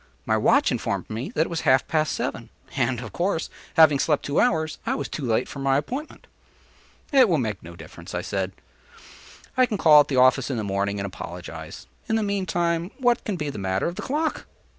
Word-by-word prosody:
My - - +2
watch - - +3
informed - - -3
me 115 +5 -4
that - - +2
it 160 - +1
was 165 - -2
half 130 -3 +3
past 155 -1 +1
seven; - - -4 0.3
and, 125 -3 0
of 110 -5 -8
course, 175 -2 -1 0.2
having 155 -3 +6
slept 150 -1 +1
two 145 - 0
hours, 160 -9 +1
I 240 +4 -1
was - - -3
too 150 - -6
late 120 0 +1
for 140 - -8
my 135 0 +2
appointment. 260 - -5 0.9
“It 265 -6 +6
will 165 - +3
make 110 -7 -2
no 85 +1 -11
difference,” - - -10
I - - -2
said: 95 -1 -2 1.0
“I 255 -1 +4
can 210 - -2
call 155 -5 +7
at 145 - +4
the 135 - -2
office 130 +1 +4
in 130 - -2
the 110 - -2
morning 100 0 -1
and 100 - -2
apologize; 90 -2 -8 0.2
in 220 - +2
the 220 - +1
meantime 175 -4 -1
what 245 -3 +2
can 205 - -2
be 150 -4 -3
the 105 - -7
matter 95 0 -1
with 170 - -2
the - - -5
clock? 305 +4 -2
150 Hz, 215 wpm, -24 LUFS, 115-185 Hz, 1.0 s, call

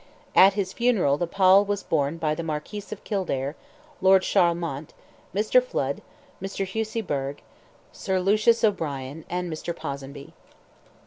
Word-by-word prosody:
At 195 +1 +7
his 190 -2 -2
funeral 210 - +2
the 175 - 0
pall 190 +2 +5
was 205 0 -2
borne 145 +3 0
by 155 -2 0
the 155 - -4
Marquis 160 +6 -4
of 210 - -7
Kildare, 155 - -2 0.5
Lord 190 0 +6
Charlemont, 170 -4 0 0.4
Mr. 215 +5 +3
Flood, 140 - -3 0.4
Mr. 195 0 -3
Hussey 220 +3 -2
Burgh, 140 -6 -3 0.5
Sir 190 -1 -2
Lucius 215 +5 +3
O'Brien, 155 -7 -1
and 180 -1 -3
Mr. 165 +2 -5
Ponsonby. 140 -2 -7
180 Hz, 135 wpm, -25 LUFS, 150-200 Hz, 0.5 s, At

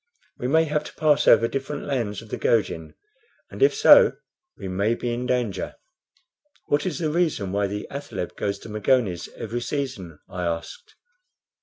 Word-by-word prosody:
We 125 - -2
may 160 +4 +4
have 150 -1 -1
to - - -10
pass 150 -2 +3
over 115 0 +6
different 135 +3 -4
lands 115 -6 -2
of 110 - -15
the - - -3
Gojin, 90 -8 0 0.6
and - - -9
if 415 - +5
so 440 +2 +7 0.4
we - - -6
may 100 +5 0
be 120 0 -3
in 125 +1 -3
danger." 120 -7 -1 0.9
"What 145 +4 +1
is 160 -7 -2
the 155 -3 -1
reason 155 - 0
why 100 0 +1
the 105 +1 -5
athaleb 140 -10 -5
goes 100 -1 -2
to - - -8
Magones 105 -4 0
every 115 +2 -4
season?" 120 - -4
I 90 -1 -6
asked. 85 -1 -5
120 Hz, 170 wpm, -24 LUFS, 100-145 Hz, 0.9 s, so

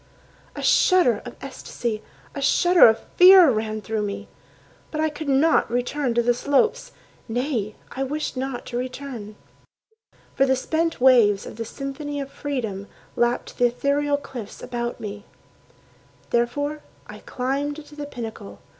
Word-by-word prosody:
A - - -6
shudder 350 - +4
of 245 - -8
ecstasy, 235 -4 -5 0.3
a 280 - -5
shudder 350 +4 +6
of 220 0 +2 0.2
fear 365 -4 +9
Ran 215 -1 -2
through 215 +1 -2
me. 205 -1 -5 0.6
But 310 - -5
I 315 0 +1
could 295 0 -6
not 280 +2 +3
return 245 +1 -1
to 235 - +3
the 245 +1 +3
slopes— 285 - +1 0.4
Nay, 235 -3 -2 0.2
I 270 - -5
wished 290 +2 -3
not 260 -1 -4
to 240 - -4
return. 250 -4 -6 1.0
For 270 0 +2
the 265 - +3
spent 325 +5 -1
waves 235 -6 +5
of - - -9
the 230 - -4
symphony 285 +4 -5
of 275 -1 -6
freedom 225 -9 -4 0.3
Lapped 240 0 -1
the 245 - +5
ethereal 285 +4 0
cliffs 245 -7 -9
about 240 -1 -4
me. 205 0 -7 1.0
Therefore 285 +6 0 0.2
I - - -11
climbed 285 +4 -3
to 295 - -15
the 295 -1 -6
pinnacle. 220 - -8
260 Hz, 145 wpm, -23 LUFS, 235-290 Hz, 1.0 s, fear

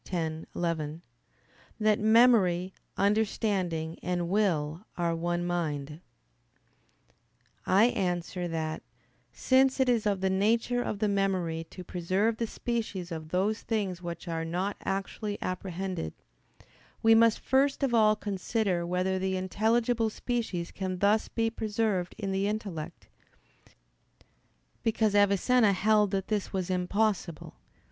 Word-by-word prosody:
x, 160 -3 -2
11) 165 -1 -2 0.8
that 215 -1 +3
"memory, 210 -5 +4 0.2
understanding, 195 -6 0
and 175 -1 -1
will 175 -5 0
are 170 -1 0
one 175 +1 -1
mind." 155 -3 -3 1.7
I 195 +3 +5
answer 180 -5 -1
that, 160 -1 -3 0.5
Since 265 +1 +3
it 260 - +3
is 235 -4 +2
of 200 -2 +1
the 190 - +2
nature 230 +5 +1
of 210 - -3
the 210 +1 +1
memory 185 -5 0
to 180 - -9
preserve 185 +6 0
the 230 - -1
species 215 -7 -3
of 160 -1 -6
those 195 +5 0
things 195 -6 -2
which 170 0 -6
are 165 -1 -2
not 180 +5 -2
actually 205 +2 -3
apprehended, 185 - -4 0.9
we 225 0 +7
must 225 0 +5
first 275 +2 +1
of 265 -3 +1
all 215 -2 +5
consider 195 -3 -1
whether 185 +1 0
the 190 0 -1
intelligible 225 +4 +1
species 215 -7 -3
can 185 -2 -4
thus 205 +3 +2
be 225 -1 -1
preserved 210 -5 -1
in 200 -3 -3
the 195 +1 0
intellect: 180 -6 -5 1.7
because 220 -2 +1
Avicenna 205 +2 +4
held 210 +2 +3
that 195 -1 -2
this 210 -2 -2
was 185 -2 -2
impossible. 185 -2 -1
195 Hz, 125 wpm, -29 LUFS, 175-220 Hz, 1.7 s, we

